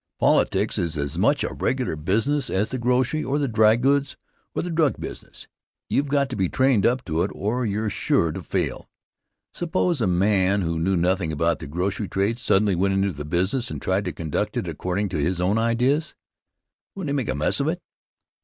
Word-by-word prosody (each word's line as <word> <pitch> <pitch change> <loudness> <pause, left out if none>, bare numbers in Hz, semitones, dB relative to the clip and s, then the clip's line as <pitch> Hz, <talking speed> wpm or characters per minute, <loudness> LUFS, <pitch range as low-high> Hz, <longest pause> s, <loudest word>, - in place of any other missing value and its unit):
Politics - - +2
is 85 -2 -2
as 70 +1 -3
much 125 +9 +3
a - - -3
regular 130 -9 -1
business 115 - 0
as 100 +4 0
the 130 - -3
grocery 125 +5 +1
or 135 +3 -1
the 145 -2 0
dry 110 -2 +4
goods 140 +3 +1 0.4
or - - -1
the 175 - -4
drug 160 -4 +1
business. - - -8 0.4
You've 145 - +1
got 140 0 +1
to - - -3
be 95 -5 0
trained 130 -6 +3
up 125 +2 0
to 80 -1 -1
it 95 - 0
or 115 +4 -1
you're 105 +1 -1
sure 85 -3 +1
to - - -6
fail. - - -3 0.6
Suppose 175 -3 0
a 110 - +2
man 95 +2 +2
who 85 -2 -1
knew 95 +3 +1
nothing 90 -1 +1
about 85 +2 0
the 80 - -7
grocery 95 +7 -2
trade 100 +6 -1
suddenly 105 -5 +2
went 95 +2 +1
into 95 0 +1
the 75 -3 -7
business 95 - 0
and - - -5
tried 95 +2 0
to 90 - -2
conduct 80 -2 -3
it - - -2
according 90 +3 -2
to 90 - -3
his 85 +4 0
own 95 +5 +2
ideas. 125 +7 +1 0.8
Wouldn't 190 -6 -4
he - - 0
make 130 -6 -1
a - - 0
mess 75 - +1
of - - 0
it? - - -1
105 Hz, 205 wpm, -24 LUFS, 90-130 Hz, 0.8 s, dry